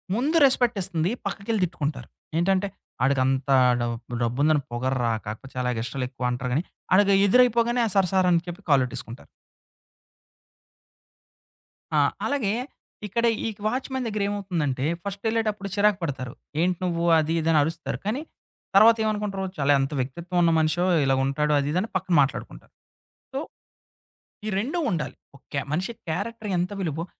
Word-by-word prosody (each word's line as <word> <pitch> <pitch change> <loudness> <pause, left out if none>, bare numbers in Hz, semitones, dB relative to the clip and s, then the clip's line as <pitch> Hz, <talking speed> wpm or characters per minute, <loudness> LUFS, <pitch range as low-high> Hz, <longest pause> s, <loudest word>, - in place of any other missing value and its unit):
ముందు 295 +8 +1
రెస్పెక్టిస్తుంది, 195 -9 +1 0.2
పక్కకెళ్ళి 210 0 -2
తిట్టుకుంటారు. 155 -4 -4 0.3
ఏంటంటే, 195 +2 +2 0.4
ఆడికి 135 0 +3
అంతా 135 +1 +2 0.2
డబ్ 120 0 -4
డబ్బుందని 145 +5 +2
పొగర్రా 125 0 0 0.2
కాకపోతే 110 +6 -7
చాలా 125 0 0
ఎగస్ట్రాలు 125 +3 -3
ఎక్కువ 125 -1 -2
అంటారు 125 +1 -3
గాని, 155 +6 +1 0.3
ఆడికి 200 0 +5
ఎదురైపోగానే, 240 +1 +4
ఆ - - -2
సార్ 190 -2 +4
సార్ 185 -1 +3
అని 170 -1 +3
చెప్పి 175 +3 -7
కాళ్లట్టేసుకుంటారు. 125 -2 0 2.7
ఆ! - - +4 0.3
అలాగే 245 -8 0 0.5
ఇక్కడ 235 +4 -1 0.2
ఈ - - 0 0.2
వాచ్‌మెన్ 260 +2 -2
దగ్గరేమవుతుందంటే 195 -10 -1 0.2
ఫస్ట్ 200 0 -5
వెళ్ళేటప్పుడు 215 -3 -1
చిరాకు 205 -1 +3
పడతారు. 130 -6 -3 0.3
ఏంటి 180 0 +1
నువ్వు 170 -1 -1
అది 155 +1 +1
ఇదని 160 -1 +3
అరుస్తారు 160 +2 -3
కానీ, 245 +8 -1 0.5
తర్వాతేమనుకుంటారు 210 -2 +4
చాలా 140 +1 +3
ఎంత 135 +3 -1
వ్యక్తిత్వం 170 +8 -4
ఉన్న 165 -1 +4
మనిషో 160 +3 +1 0.2
ఇలాగుంటాడు 135 +3 +1
అది 140 0 -1
ఇదని 185 +7 0
పక్కన 185 -1 0
మాట్లాడుకుంటారు. 135 - -5 0.6
సో, 265 - -2 1.1
ఈ - - -1
రెండు 280 - -2
ఉండాలి. 165 -4 -3 0.2
ఓకే, 140 +1 -5
మనిషి 190 +8 -1 0.2
క్యారెక్టర్ 210 +5 -3
ఎంత 180 +3 -1
విలువో 165 -1 -2
175 Hz, 130 wpm, -25 LUFS, 140-210 Hz, 2.7 s, ఆడికి